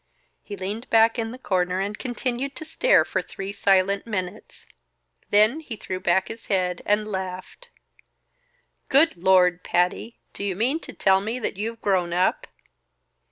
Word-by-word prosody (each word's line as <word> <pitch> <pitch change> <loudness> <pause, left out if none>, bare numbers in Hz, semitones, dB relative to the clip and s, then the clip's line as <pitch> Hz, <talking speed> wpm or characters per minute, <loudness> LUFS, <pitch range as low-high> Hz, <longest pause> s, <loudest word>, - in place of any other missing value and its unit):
He 205 - -8
leaned 205 +6 -5
back 225 +1 +4
in 225 -1 -2
the 245 - -8
corner 185 -6 -1
and 200 +2 -2
continued 255 +3 -3
to 315 - -7
stare - - +3
for - - -1
three 195 0 -7
silent 200 +1 +2
minutes; 195 -1 -5 0.6
then 215 +8 +4
he 280 -8 -7
threw 185 -3 -5
back 185 +1 +1
his 225 +1 -9
head 180 -3 0
and 210 +1 +1
laughed. 190 - -6 1.2
"Good 295 +5 +4
Lord, 180 0 +3
Patty! 180 +6 0 0.2
Do - - -6
you 195 -2 -1
mean 250 - 0
to - - -10
tell 190 0 +3
me 220 +4 -3
that 250 - -3
you've 225 +3 -5
grown 180 -4 +1
up?" 180 +1 +1
200 Hz, 160 wpm, -24 LUFS, 185-230 Hz, 1.2 s, back